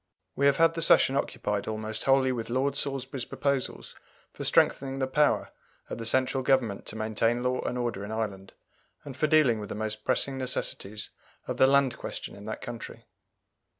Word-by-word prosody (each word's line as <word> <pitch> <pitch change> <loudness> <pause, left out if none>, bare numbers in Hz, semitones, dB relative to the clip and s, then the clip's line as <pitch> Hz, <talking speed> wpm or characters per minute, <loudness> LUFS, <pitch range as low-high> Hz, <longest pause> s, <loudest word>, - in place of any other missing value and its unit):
We 140 - +3
have 140 - +3
had 165 0 +4
the 165 - -4
Session 135 -4 +5
occupied 105 -7 -2
almost 110 0 -4
wholly 135 0 +4
with 120 -3 -4
Lord 135 +3 0
Salisbury's 135 -2 -3
proposals 140 +1 -2 0.4
for - - -7
strengthening 135 0 +2
the 135 - 0
power 150 +3 +1 0.4
of - - -4
the 115 - -1
central 130 +2 +2
Government 125 -6 +1
to - - -5
maintain 110 +2 0
law 125 0 0
and 125 - -3
order 120 -5 -2
in 105 - -6
Ireland, 100 -3 -4 0.5
and 140 -3 -8
for 155 +4 +1
dealing 145 -7 +4
with 105 -2 -7
the - - -4
most 110 0 -3
pressing 135 +4 +1
necessities 110 -5 -3 0.4
of - - -3
the 130 - +6
Land 135 -3 +3
question - - -6
in 100 - -11
that 110 0 -5
country. 120 -1 -8
125 Hz, 185 wpm, -28 LUFS, 110-135 Hz, 0.5 s, the